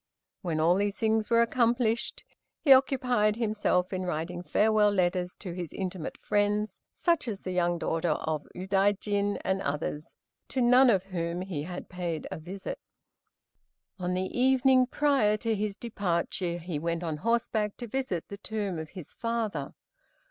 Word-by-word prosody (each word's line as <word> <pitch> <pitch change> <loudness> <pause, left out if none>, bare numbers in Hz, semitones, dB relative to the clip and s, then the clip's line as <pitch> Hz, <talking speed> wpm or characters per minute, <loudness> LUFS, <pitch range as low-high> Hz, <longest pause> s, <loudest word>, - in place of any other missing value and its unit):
When 165 -3 -1
all 165 +3 +5
these 200 +1 0
things 220 -1 +1
were 235 0 +5
accomplished, 235 -1 +1 0.4
he 275 - +7
occupied 250 -5 +3
himself 210 -5 0
in 185 - -1
writing 175 0 -3
farewell 210 +5 +3
letters 180 -2 0
to 180 -4 -7
his 175 -3 -5
intimate 185 -4 -4
friends, 205 0 0
such 335 -7 +1
as 205 -4 -4
the 185 - -4
young 175 -1 +1
daughter 165 -1 0
of 155 -1 -3
Udaijin 200 +2 +1
and 190 0 +1
others, 150 0 -3 0.3
to 265 - -3
none 250 +1 +6
of 195 -5 +3
whom 175 -2 -3
he 185 -6 -4
had 175 +4 -6
paid 175 -4 -4
a - - -4
visit. 185 +5 -6 1.2
On 180 0 -1
the 185 +1 -3
evening 260 0 +4
prior 265 -7 +2
to 225 +1 -1
his 210 -1 -2
departure 180 -5 -1
he 170 -3 -4
went 170 +2 -2
on 160 -3 -2
horseback 220 +1 0
to 245 - -5
visit 235 -8 -3
the 200 - -7
tomb 205 -5 -3
of 160 -1 -6
his 175 -3 -10
father. 225 -11 -2
195 Hz, 155 wpm, -29 LUFS, 175-225 Hz, 1.2 s, he